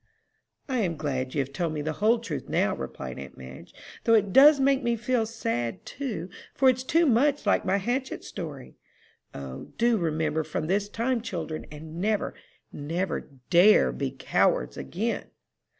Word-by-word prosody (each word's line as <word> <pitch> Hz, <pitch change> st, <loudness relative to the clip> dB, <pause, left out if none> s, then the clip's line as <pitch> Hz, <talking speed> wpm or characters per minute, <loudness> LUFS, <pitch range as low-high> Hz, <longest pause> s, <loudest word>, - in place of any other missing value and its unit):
"I 260 Hz, -3 st, 0 dB
am 175 Hz, -7 st, 0 dB
glad 130 Hz, -3 st, -3 dB
you 145 Hz, -, +2 dB
have 135 Hz, +1 st, -6 dB
told 165 Hz, +2 st, -1 dB
me 150 Hz, -1 st, -3 dB
the 155 Hz, +1 st, -2 dB
whole 225 Hz, +3 st, +5 dB
truth 215 Hz, -11 st, -6 dB
now," -, -, +1 dB
replied 65 Hz, -1 st, -6 dB
aunt 70 Hz, -, -10 dB
Madge, 65 Hz, +1 st, -11 dB, 0.3 s
"though 230 Hz, -, +5 dB
it 205 Hz, -3 st, +2 dB
does 285 Hz, +2 st, +8 dB
make 270 Hz, 0 st, +3 dB
me 235 Hz, -2 st, +1 dB
feel 235 Hz, 0 st, 0 dB
sad, 120 Hz, -, -3 dB
too, 230 Hz, -, -4 dB, 0.3 s
for 265 Hz, -, +5 dB
it's 255 Hz, 0 st, -4 dB
too 330 Hz, +6 st, +3 dB
much 285 Hz, +3 st, +3 dB
like -, -, +2 dB
my 190 Hz, +1 st, +2 dB
hatchet 250 Hz, +6 st, -2 dB
story. 150 Hz, -8 st, -8 dB, 0.6 s
O, 65 Hz, -1 st, -7 dB
do 235 Hz, -1 st, +3 dB
remember 160 Hz, -1 st, 0 dB
from 155 Hz, -, -3 dB
this 200 Hz, +4 st, 0 dB
time, 235 Hz, +3 st, -1 dB
children, 165 Hz, -7 st, -5 dB
and 160 Hz, +3 st, -8 dB
never, 210 Hz, +1 st, 0 dB, 0.4 s
never, 165 Hz, +5 st, -3 dB, 0.2 s
dare 185 Hz, +5 st, +6 dB
be 140 Hz, -2 st, -2 dB
cowards 130 Hz, 0 st, +1 dB
again!" 65 Hz, -, -3 dB
185 Hz, 165 wpm, -27 LUFS, 150-235 Hz, 0.6 s, does